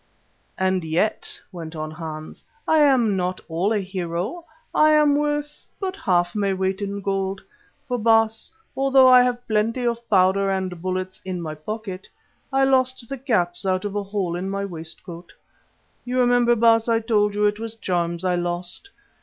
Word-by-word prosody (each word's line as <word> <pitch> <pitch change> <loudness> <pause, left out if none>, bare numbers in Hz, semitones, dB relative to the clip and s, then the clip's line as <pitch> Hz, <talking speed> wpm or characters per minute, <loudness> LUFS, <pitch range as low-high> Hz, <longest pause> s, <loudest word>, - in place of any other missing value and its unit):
"And 185 -1 +1
yet," 165 +7 -1
went 165 -3 -8
on 155 0 -4
Hans, 155 -1 -8 0.2
"I 315 - +4
am 255 -8 +4
not 185 0 -1
all 175 +6 0
a 220 - +2
hero; 185 - -4 0.3
I 310 0 +5
am 300 -1 +5
worth 295 0 -2
but 385 -1 -3
half 175 - +1
my 200 -2 0
weight 190 +1 -1
in 200 0 -3
gold. 195 -1 -1 0.5
For, 250 -2 -1
Baas, 225 0 +2 0.2
although 270 -1 +5
I 255 -1 +8
have 245 0 0
plenty 225 +3 0
of 235 0 -2
powder 195 0 +3
and 185 -3 -2
bullets 185 +1 -3
in 185 -1 -4
my 160 -2 -4
pocket, 190 +4 -6 0.4
I 270 0 +3
lost 260 -2 +2
the 275 - -4
caps 180 -10 0
out 185 0 0
of 205 0 -4
a 205 - 0
hole 195 -3 -2
in 185 +2 -3
my 200 0 -2
waistcoat. 170 0 -9 0.7
You 250 +1 -2
remember, 245 -1 +4
Baas, 230 0 +4
I 230 -1 +3
told 210 -2 +1
you 210 0 +2
it 210 +1 +1
was 225 0 -5
charms 175 -4 -2
I 180 - +2
lost. 175 - -3
200 Hz, 170 wpm, -23 LUFS, 180-240 Hz, 0.7 s, I